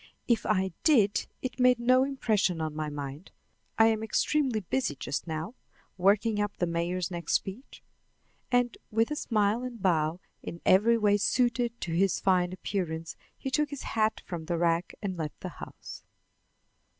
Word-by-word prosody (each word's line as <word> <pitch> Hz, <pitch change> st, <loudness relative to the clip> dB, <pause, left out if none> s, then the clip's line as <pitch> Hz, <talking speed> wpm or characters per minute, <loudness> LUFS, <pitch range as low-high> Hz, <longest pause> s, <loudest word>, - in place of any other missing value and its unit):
"If 235 Hz, -2 st, +1 dB
I 190 Hz, -2 st, +1 dB
did, 220 Hz, -10 st, +3 dB, 0.2 s
it 255 Hz, 0 st, -4 dB
made 250 Hz, -1 st, +5 dB
no 255 Hz, +2 st, +4 dB
impression 220 Hz, -10 st, 0 dB
on 155 Hz, -1 st, -2 dB
my 155 Hz, -1 st, -2 dB
mind. 145 Hz, +3 st, -7 dB, 0.5 s
I 225 Hz, -, +7 dB
am 220 Hz, -1 st, 0 dB
extremely 245 Hz, +1 st, +1 dB
busy 240 Hz, -, -1 dB
just 135 Hz, +4 st, -4 dB
now, 160 Hz, +6 st, -4 dB, 0.4 s
working 205 Hz, +3 st, +2 dB
up 205 Hz, -1 st, -3 dB
the 175 Hz, -, +1 dB
mayor's 170 Hz, +1 st, -2 dB
next 170 Hz, -1 st, -3 dB
speech." 205 Hz, +8 st, -3 dB, 0.7 s
And 245 Hz, -1 st, +1 dB
with 225 Hz, +4 st, +1 dB
a -, -, 0 dB
smile 215 Hz, -4 st, +1 dB
and 250 Hz, -2 st, -6 dB
bow 165 Hz, -3 st, +1 dB, 0.2 s
in 170 Hz, -, -7 dB
every 225 Hz, +5 st, +5 dB
way 205 Hz, -2 st, +3 dB
suited 240 Hz, +2 st, +1 dB
to 170 Hz, -, -3 dB
his 180 Hz, +2 st, +2 dB
fine 180 Hz, -2 st, +2 dB
appearance, 170 Hz, -3 st, -4 dB, 0.2 s
he 265 Hz, -, -5 dB
took 300 Hz, +2 st, +1 dB
his 285 Hz, -2 st, -6 dB
hat 220 Hz, -1 st, 0 dB
from 170 Hz, -3 st, -6 dB
the 170 Hz, +1 st, -1 dB
rack 170 Hz, +1 st, +1 dB
and 190 Hz, -3 st, -3 dB
left 155 Hz, -2 st, -5 dB
the -, -, -4 dB
house. -, -, -9 dB
200 Hz, 165 wpm, -29 LUFS, 170-235 Hz, 0.7 s, I